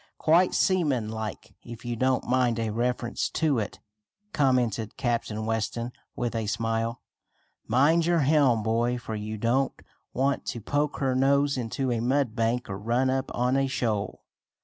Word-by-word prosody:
Quite 170 Hz, +3 st, +3 dB
seaman 145 Hz, -, +2 dB
like, 110 Hz, -1 st, -6 dB
if 120 Hz, +1 st, -10 dB
you 120 Hz, 0 st, -2 dB
don't 130 Hz, +2 st, +1 dB
mind 125 Hz, -2 st, +2 dB
a 115 Hz, -1 st, -1 dB
reference 120 Hz, +1 st, -1 dB
to 150 Hz, -6 st, +2 dB
it," 105 Hz, -, -5 dB, 0.5 s
commented 125 Hz, -6 st, +1 dB
Captain 115 Hz, -3 st, -1 dB
Weston 115 Hz, +2 st, -2 dB, 0.2 s
with 120 Hz, -2 st, -2 dB
a 110 Hz, -2 st, -2 dB
smile. 115 Hz, +2 st, -1 dB, 0.6 s
"Mind 150 Hz, +8 st, +3 dB
your 170 Hz, -2 st, +3 dB
helm, 135 Hz, -6 st, +3 dB
boy, 120 Hz, +2 st, +1 dB
for 115 Hz, -2 st, -6 dB
you 110 Hz, 0 st, -4 dB
don't 125 Hz, +5 st, +1 dB, 0.4 s
want 135 Hz, +2 st, 0 dB
to 120 Hz, -, -3 dB
poke 145 Hz, +6 st, -1 dB
her 135 Hz, -2 st, 0 dB
nose 140 Hz, +2 st, +3 dB
into 125 Hz, +1 st, -2 dB
a 120 Hz, -, 0 dB
mud 125 Hz, -1 st, +1 dB
bank, 115 Hz, +1 st, 0 dB
or 95 Hz, -1 st, -5 dB
run 120 Hz, +5 st, +1 dB
up 130 Hz, 0 st, -1 dB
on 125 Hz, +2 st, +1 dB
a 135 Hz, 0 st, +2 dB
shoal." 115 Hz, -6 st, -2 dB
120 Hz, 160 wpm, -27 LUFS, 115-135 Hz, 0.6 s, Quite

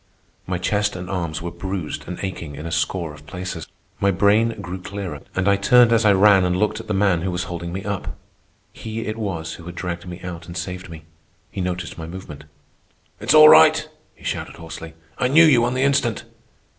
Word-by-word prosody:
My 90 Hz, 0 st, -1 dB
chest 100 Hz, +3 st, 0 dB
and 90 Hz, 0 st, -6 dB
arms 85 Hz, -4 st, -3 dB
were 85 Hz, -, -4 dB
bruised 90 Hz, -2 st, -5 dB
and 90 Hz, -, -5 dB
aching 85 Hz, -6 st, -5 dB
in 75 Hz, +3 st, -8 dB
a 85 Hz, -, -5 dB
score 85 Hz, -2 st, -1 dB
of 75 Hz, 0 st, -15 dB
places. 90 Hz, -3 st, -6 dB, 0.3 s
My 100 Hz, -, +2 dB
brain 105 Hz, +4 st, +2 dB
grew 95 Hz, -1 st, -6 dB
clearer, 95 Hz, -6 st, -6 dB
and 90 Hz, +1 st, 0 dB
I 100 Hz, 0 st, +4 dB
turned 120 Hz, +3 st, +5 dB
as 115 Hz, -1 st, +3 dB
I 105 Hz, -, +6 dB
ran 95 Hz, 0 st, +6 dB
and 90 Hz, 0 st, +1 dB
looked 105 Hz, +2 st, 0 dB
at 115 Hz, -, -9 dB
the 105 Hz, -, -1 dB
man 95 Hz, -4 st, +2 dB
who 95 Hz, -, -2 dB
was 90 Hz, 0 st, -2 dB
holding 85 Hz, -1 st, -6 dB
me 95 Hz, +2 st, -5 dB
up. 100 Hz, -1 st, -4 dB, 0.6 s
He 110 Hz, 0 st, -6 dB
it 110 Hz, -1 st, -4 dB
was 95 Hz, -8 st, -4 dB
who 85 Hz, -, -11 dB
had 90 Hz, 0 st, -8 dB
dragged 90 Hz, 0 st, -5 dB
me 90 Hz, 0 st, -7 dB
out 90 Hz, -2 st, -7 dB
and 85 Hz, 0 st, -7 dB
saved 90 Hz, +1 st, -5 dB
me. 80 Hz, -2 st, -10 dB, 0.5 s
He 100 Hz, -, -4 dB
noticed 90 Hz, -1 st, -4 dB
my 80 Hz, -, -6 dB
movement. 80 Hz, -5 st, -9 dB, 0.7 s
"It's 115 Hz, +8 st, +2 dB
all 155 Hz, 0 st, +10 dB
right!" 155 Hz, -1 st, +6 dB, 0.3 s
he -, -, -21 dB
shouted -, -, -4 dB
hoarsely. 80 Hz, 0 st, -9 dB, 0.2 s
"I 125 Hz, -, +2 dB
knew 160 Hz, +6 st, +7 dB
you 130 Hz, -7 st, +5 dB
on 120 Hz, +1 st, 0 dB
the 130 Hz, -, +1 dB
instant." 135 Hz, -5 st, +1 dB
95 Hz, 215 wpm, -22 LUFS, 85-105 Hz, 0.7 s, all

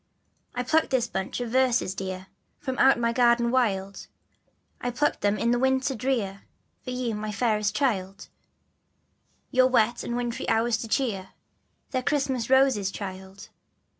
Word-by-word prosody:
I 250 Hz, -, -1 dB
plucked 315 Hz, +5 st, +2 dB
this 260 Hz, -3 st, +1 dB
bunch 190 Hz, -2 st, -4 dB
of 240 Hz, -2 st, -4 dB
verses, 250 Hz, -6 st, +2 dB
dear, 185 Hz, -1 st, -5 dB, 0.3 s
From 260 Hz, -3 st, -4 dB
out 270 Hz, -, +6 dB
my 235 Hz, 0 st, 0 dB
garden 235 Hz, -1 st, +3 dB
wild, 200 Hz, -6 st, -1 dB, 0.7 s
I 245 Hz, -, -1 dB
plucked 290 Hz, +5 st, 0 dB
them 205 Hz, +1 st, +1 dB
in 235 Hz, -, +1 dB
the 240 Hz, -, +2 dB
winter 265 Hz, +1 st, +1 dB
drear 220 Hz, -6 st, -2 dB, 0.4 s
For -, -, -7 dB
you, 250 Hz, -2 st, -2 dB
my 210 Hz, 0 st, -4 dB
fairest 210 Hz, -1 st, 0 dB
child, 195 Hz, -7 st, -1 dB, 1.2 s
Your 255 Hz, -1 st, +5 dB
wet 240 Hz, -2 st, +2 dB
and 240 Hz, -, -3 dB
wintry 240 Hz, -1 st, -3 dB
hours 225 Hz, +1 st, +2 dB
to 230 Hz, -, -6 dB
cheer, 215 Hz, -6 st, -1 dB, 0.6 s
They're 260 Hz, -2 st, 0 dB
Christmas 265 Hz, -3 st, -1 dB
Roses, 265 Hz, -7 st, +4 dB
child. 190 Hz, -1 st, -8 dB
235 Hz, 150 wpm, -26 LUFS, 205-255 Hz, 1.2 s, out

